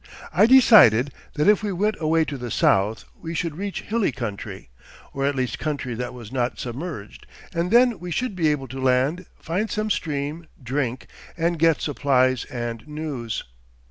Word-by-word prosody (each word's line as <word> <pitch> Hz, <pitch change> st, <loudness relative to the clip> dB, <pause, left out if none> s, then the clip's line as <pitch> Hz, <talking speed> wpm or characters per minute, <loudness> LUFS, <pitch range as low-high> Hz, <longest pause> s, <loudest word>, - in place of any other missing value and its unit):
I 195 Hz, +7 st, +5 dB
decided 185 Hz, -, +7 dB, 0.2 s
that 150 Hz, +3 st, +1 dB
if 210 Hz, 0 st, +5 dB
we 210 Hz, -1 st, -2 dB
went 210 Hz, +4 st, 0 dB
away 160 Hz, 0 st, +2 dB
to 145 Hz, -, -5 dB
the 120 Hz, -2 st, -6 dB
south 105 Hz, +1 st, +2 dB, 0.2 s
we 165 Hz, 0 st, -5 dB
should 165 Hz, -2 st, -2 dB
reach 200 Hz, +3 st, -4 dB
hilly 220 Hz, -6 st, 0 dB
country, 105 Hz, -, -6 dB, 0.4 s
or 135 Hz, 0 st, 0 dB
at 145 Hz, -, 0 dB
least 125 Hz, -4 st, -2 dB
country 140 Hz, -5 st, -3 dB
that 120 Hz, +1 st, -4 dB
was 120 Hz, -4 st, -10 dB
not 125 Hz, -2 st, -1 dB
submerged, 125 Hz, -, -7 dB, 0.3 s
and 170 Hz, +1 st, -1 dB
then 240 Hz, -1 st, +4 dB
we 180 Hz, +1 st, -7 dB
should 225 Hz, +4 st, -2 dB
be 165 Hz, -4 st, +1 dB
able 145 Hz, -3 st, 0 dB
to 130 Hz, +2 st, -6 dB
land, 130 Hz, +7 st, +1 dB
find 190 Hz, +7 st, -2 dB
some 215 Hz, 0 st, -2 dB
stream, 150 Hz, 0 st, -3 dB, 0.2 s
drink, 130 Hz, 0 st, -2 dB, 0.3 s
and 170 Hz, 0 st, 0 dB
get 165 Hz, -1 st, +3 dB
supplies 130 Hz, -4 st, +1 dB
and 120 Hz, 0 st, -5 dB
news. 150 Hz, -7 st, -4 dB
150 Hz, 175 wpm, -23 LUFS, 125-175 Hz, 0.4 s, decided